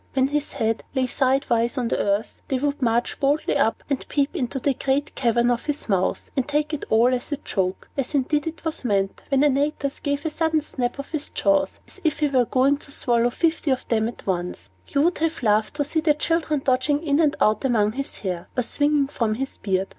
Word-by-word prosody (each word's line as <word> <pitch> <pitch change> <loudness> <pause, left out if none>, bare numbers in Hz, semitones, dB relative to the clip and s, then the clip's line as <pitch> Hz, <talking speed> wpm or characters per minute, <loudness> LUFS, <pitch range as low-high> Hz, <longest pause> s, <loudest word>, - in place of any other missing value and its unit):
When 265 0 +3
his 295 0 -2
head 225 0 -1
lay 260 -1 +2
sidewise 255 -2 +1
on 245 -2 0
the - - 0
earth, 200 +2 -1
they 265 - 0
would 285 +2 -1
march 235 0 +1
boldly 285 +2 +1
up, 275 -6 +1
and 275 -2 -2
peep 280 -1 0
into 255 +1 -2
the 275 +2 +1
great 275 +2 -1
cavern 240 -1 +2
of 240 - -1
his 295 0 -2
mouth, 190 -3 0
and 265 -3 0
take 295 +1 0
it 300 - -3
all 235 +3 +4
as 250 +3 -3
a 290 - 0
joke 185 -5 -2
(as 275 +1 -2
indeed 290 +3 +1
it 325 +1 -6
was 320 -3 -2
meant) 195 -4 0
when 275 0 +3
Antaeus 285 0 +1
gave 285 +1 -2
a 320 - 0
sudden 320 -1 +1
snap 245 -4 -3
of 280 - -7
his 310 -2 -1
jaws, 295 -1 +1
as - - -16
if 315 -3 +1
he 300 -2 +1
were 255 -3 +3
going 265 +4 +3
to 285 - -13
swallow 240 -3 +2
fifty 320 +3 0
of 260 -1 0
them 220 -1 +2
at 235 - -8
once. 175 - -3 0.2
You 280 0 +1
would 345 +2 +1
have 320 -4 -1
laughed 215 +3 +2
to 295 - +1
see 295 +3 0
the 310 -2 +3
children 310 -2 0
dodging 280 +4 +2
in 290 -1 +2
and 300 -3 +3
out 215 +4 +2
among 220 -5 +2
his 275 +4 -5
hair, 180 -2 -3
or 250 - +2
swinging 290 +3 +1
from 230 -6 -1
his 270 +3 -4
beard. 190 -1 0
270 Hz, 225 wpm, -23 LUFS, 235-295 Hz, 0.2 s, all